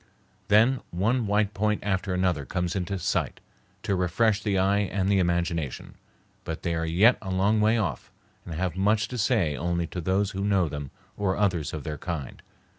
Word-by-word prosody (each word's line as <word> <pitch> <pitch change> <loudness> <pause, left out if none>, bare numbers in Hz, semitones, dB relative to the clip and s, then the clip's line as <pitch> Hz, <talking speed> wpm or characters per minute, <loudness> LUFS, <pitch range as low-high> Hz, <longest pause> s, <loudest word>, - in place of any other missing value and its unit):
Then 115 +5 +4
one 110 +6 0
white 105 +1 +1
point 105 +1 0
after 95 -1 -1
another 90 -5 0
comes 90 +6 -2
into 95 +1 -2
sight 90 - -1 0.4
to 100 - 0
refresh 105 +4 +1
the 100 -3 0
eye 100 +2 +3
and 100 -1 -1
the 100 -1 +3
imagination; 85 -5 -1 0.5
but - - -6
they 85 - 0
are 80 0 -1
yet 100 +10 +4
a 95 - -6
long 100 +4 +2
way 110 +2 +3
off, 90 - -3 0.3
and 85 - -7
have 90 0 -2
much 105 +3 +2
to 125 - -4
say 100 - +2
only 85 +1 -1
to 90 - -5
those 95 +4 +1
who 95 0 -3
know 100 -4 +2
them 75 -2 -6 0.3
or 95 -2 0
others 90 -7 0
of 75 -3 -5
their 75 0 -5
kind. 80 -7 -5
95 Hz, 190 wpm, -26 LUFS, 85-105 Hz, 0.5 s, Then